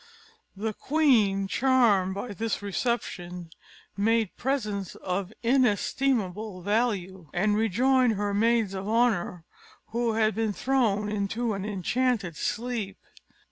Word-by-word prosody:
The 215 +2 -2
queen, 220 -10 +2
charmed 205 -4 +3
by 200 +5 -4
this 220 0 -3
reception, 180 -5 -3 0.4
made 220 0 +1
presents 210 -8 -2
of 185 +1 -3
inestimable 220 -5 +1
value, 190 -5 -1
and 205 +4 +2
rejoined 245 +4 +3
her 205 0 -2
maids 225 -1 +2
of 195 +1 -4
honour, 215 -7 +1 0.4
who 235 0 0
had 220 0 +2
been 220 0 -1
thrown 220 -5 +1
into 210 +3 -1
an 195 0 -4
enchanted 210 -1 -1
sleep. 225 0 -3
215 Hz, 110 wpm, -27 LUFS, 195-235 Hz, 0.4 s, charmed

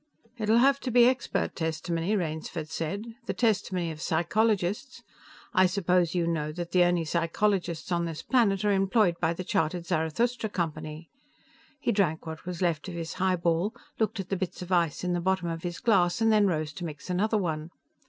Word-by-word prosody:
"It'll 220 +1 +3
have 275 +3 +4
to 260 - -4
be 240 0 +6
expert 255 +2 0
testimony," 165 +3 -1
Rainsford 160 -3 -3
said. 200 +9 -4
"The - - -2
testimony 195 -7 0
of 155 0 -9
psychologists. 205 +7 0 0.5
I 185 0 +5
suppose 180 -2 +1
you 175 -1 +2
know 155 -3 -1
that 175 +1 -5
the 180 0 +5
only 175 -2 +1
psychologists 170 +1 0
on 170 -1 +1
this 165 -2 -5
planet 210 -6 +2
are 205 - +4
employed 195 -2 +2
by 165 0 +1
the 185 - -4
chartered 175 -2 -1
Zarathustra 220 +10 0
Company." 155 -3 -4 0.7
He 260 - 0
drank 175 -7 +1
what 160 +2 -8
was 180 0 -3
left 170 -2 0
of 180 - -6
his 165 -1 -4
highball, 180 +2 +1 0.2
looked 220 -1 0
at 190 - -5
the 195 - 0
bits 180 0 -4
of 180 - -10
ice 170 -4 +1
in 180 0 0
the 175 - 0
bottom 190 0 0
of 165 0 -4
his 175 -1 -4
glass 185 -6 +3
and 225 0 +3
then 210 -1 +5
rose 155 -4 -1
to 175 - -7
mix 155 +3 -7
another 215 +5 +1
one. 160 -5 -2
175 Hz, 190 wpm, -28 LUFS, 165-205 Hz, 0.7 s, be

